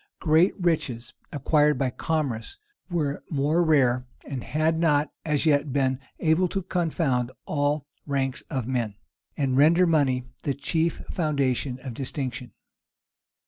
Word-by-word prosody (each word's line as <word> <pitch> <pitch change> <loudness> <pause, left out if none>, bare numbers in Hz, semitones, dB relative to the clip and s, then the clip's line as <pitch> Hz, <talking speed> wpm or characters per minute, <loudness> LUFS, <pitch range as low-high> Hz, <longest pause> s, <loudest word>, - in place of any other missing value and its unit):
Great 160 +4 +4
riches 140 -9 -1 0.2
acquired 150 0 +3
by 130 -1 0
commerce 150 - -2 0.3
were 150 -5 -1
more 150 +3 +2
rare, 130 -6 +3 0.2
and 135 -4 -4
had 155 +4 0
not 150 -3 +2
as 150 -1 0
yet 145 -2 +3
been 130 -1 +1 0.2
able 165 +3 +3
to 195 +2 -3
confound 160 -9 0 0.2
all 145 -1 0 0.2
ranks 135 -2 -1
of 130 -4 -2
men, 120 -5 -1 0.4
and 135 -3 +1
render 165 +6 +6
money 140 -6 +2 0.2
the 140 - -1
chief 160 +4 -1
foundation 140 -6 0
of 130 -2 -6
distinction. 130 -1 -4
145 Hz, 130 wpm, -26 LUFS, 130-160 Hz, 0.4 s, render